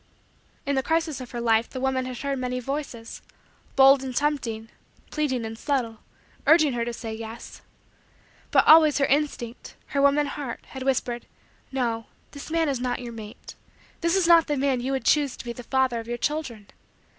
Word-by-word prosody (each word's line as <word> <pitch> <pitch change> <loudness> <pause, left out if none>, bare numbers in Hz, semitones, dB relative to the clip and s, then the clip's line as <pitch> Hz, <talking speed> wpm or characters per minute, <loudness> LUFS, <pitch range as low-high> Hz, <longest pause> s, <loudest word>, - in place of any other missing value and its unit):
In 280 - 0
the 265 - +2
crisis 320 -1 -1
of 255 - -8
her 240 - -5
life 230 0 +2
the 260 - -6
woman 260 0 0
had 255 -1 -6
heard 275 0 -2
many 250 0 -2
voices 255 -3 -5 0.5
bold 270 0 +7
and 260 -2 -5
tempting, 240 -7 -1 0.4
pleading 260 -6 -1
and 225 0 -5
subtle 235 -4 -2 0.5
urging 310 -4 +5
her 235 -1 -1
to 240 - -3
say: 225 -1 -6
"Yes." 225 +1 -8 0.9
But - - +4
always 310 -1 +7
her 280 - +3
instinct 275 -5 -2
her 280 - 0
woman 280 +1 +4
heart 280 -3 -6
had 265 - -8
whispered: 255 -2 -1 0.4
"No. 235 -4 -2 0.2
This 285 +1 -9
man 325 0 +1
is 275 -3 -1
not 250 0 -1
your 240 -2 -7
mate. 215 -2 -10 0.5
This 335 +2 +1
is 380 -2 +3
not 335 -1 +6
the 295 - 0
man 265 -2 +1
you 260 +2 -2
would 265 -3 -2
choose 285 -2 +2
to - - -9
be 235 - -4
the 245 - -9
father 260 -1 +1
of 225 - -8
your 240 0 -3
children. 250 -7 -3
260 Hz, 190 wpm, -25 LUFS, 235-285 Hz, 0.9 s, bold